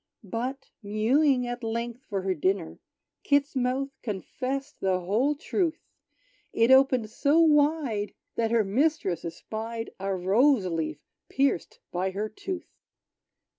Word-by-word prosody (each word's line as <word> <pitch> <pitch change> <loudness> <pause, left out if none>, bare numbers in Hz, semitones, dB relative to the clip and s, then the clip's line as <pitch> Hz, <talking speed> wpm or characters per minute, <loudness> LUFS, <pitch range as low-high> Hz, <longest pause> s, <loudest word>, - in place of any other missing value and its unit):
But, 250 +7 -4
mewing 250 +6 +2
at 245 0 -5
length 235 +2 -3
for 195 -2 -2
her 190 0 +1
dinner, 185 +1 -1 0.4
Kit's 285 0 +2
mouth 260 +2 0
confessed 255 +6 -4
the 185 -1 +1
whole 230 +11 +1
truth: 330 +1 -1 0.8
It 230 +2 +4
opened 260 -4 +5
so 285 +7 +3
wide 295 -9 +3 0.2
that 225 -1 0
her 230 -1 +3
mistress 205 - 0
espied 225 +7 -5
A 195 0 -1
rose 205 +6 +3
leaf 160 -4 -2 0.3
pierced 270 -9 0
by 185 +2 -1
her 205 +3 -3
tooth! 380 - -6
235 Hz, 125 wpm, -27 LUFS, 195-275 Hz, 0.8 s, opened